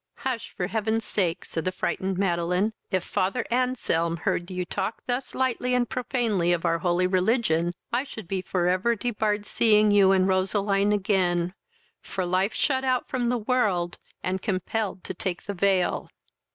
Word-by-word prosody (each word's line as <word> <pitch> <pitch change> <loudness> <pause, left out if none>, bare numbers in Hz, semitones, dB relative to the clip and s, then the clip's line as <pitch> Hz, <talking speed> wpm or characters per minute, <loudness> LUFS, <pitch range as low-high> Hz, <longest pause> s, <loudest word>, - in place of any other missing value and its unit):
"Hush, 255 -4 -2
for 180 - 0
heaven's 220 +2 -1
sake! 180 -3 -1
(said 165 - -3
the 185 - 0
frightened 190 0 -2
Madeline;) 180 +2 +1 0.2
if 185 -3 0
Father 195 +6 -1
Anselm 235 -10 +1
heard 180 -1 -1
you 180 -1 -3
talk 215 - -3
thus 250 +1 -3
lightly 250 -1 0
and 245 -1 +2
profanely 230 -9 0
of 170 - -1
our 165 0 +2
holy 175 +1 +2
religion, 180 -3 +1 0.2
I 245 +2 +2
should 220 -9 -9
be 190 +1 -1
for 180 -1 0
ever 185 +6 +2
debarred 210 -2 -1
seeing 215 -2 +4
you 200 -2 +6
and 190 -1 +4
Roseline 195 +1 +2
again, 185 -4 +1 0.5
for 185 - -3
life 185 +4 +1
shut 265 -2 +1
out 255 -1 0
from 245 -2 0
the 245 - +1
world, 210 -7 0 0.2
and 185 +1 -1
compelled 195 0 -2
to - - -5
take 185 -2 -4
the 200 - -3
veil." 190 -1 +1
195 Hz, 165 wpm, -26 LUFS, 180-225 Hz, 0.5 s, you